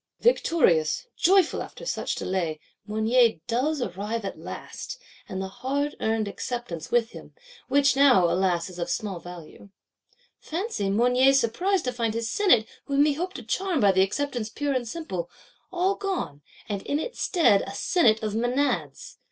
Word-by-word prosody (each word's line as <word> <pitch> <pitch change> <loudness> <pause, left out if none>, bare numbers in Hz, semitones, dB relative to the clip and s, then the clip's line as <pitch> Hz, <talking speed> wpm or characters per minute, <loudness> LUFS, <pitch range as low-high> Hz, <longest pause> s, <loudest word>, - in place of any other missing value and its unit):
Victorious, 285 - +2
joyful 375 -1 +3
after - - -9
such - - -2
delay, 170 -5 -2 0.3
Mounier 220 +2 +3
does 265 +4 0
arrive 205 +3 -4
at 195 - -5
last, - - -8 0.3
and 190 -2 -4
the 190 - -3
hard 280 +8 -2
earned 220 -1 0
Acceptance 200 -6 -5
with 240 -1 +2
him; - - -12 0.3
which 280 -1 +3
now, 265 -10 +6
alas, 180 -1 +1
is 180 -2 -10
of 170 - -3
small 200 -5 -3
value. 175 +2 -11 0.7
Fancy 320 - -3
Mounier's 250 +6 +4
surprise 355 - 0
to 250 - -2
find 230 -2 -1
his 230 -1 -2
Senate, 295 - +4 0.2
whom 280 0 +3
he 300 - +2
hoped 360 +6 -4
to - - -7
charm 375 -5 -1
by 205 -4 +5
the 190 0 +3
Acceptance 240 +2 -1
pure 290 +4 -2
and 250 -2 -1
simple,—all 305 - -4
gone; 370 - -3 0.3
and 200 -2 -3
in 285 - -1
its 480 +10 -5
stead 320 - +4
a 195 - -7
Senate 220 - +2
of 215 -1 -2
Menads! 240 - -1
235 Hz, 160 wpm, -26 LUFS, 195-290 Hz, 0.7 s, now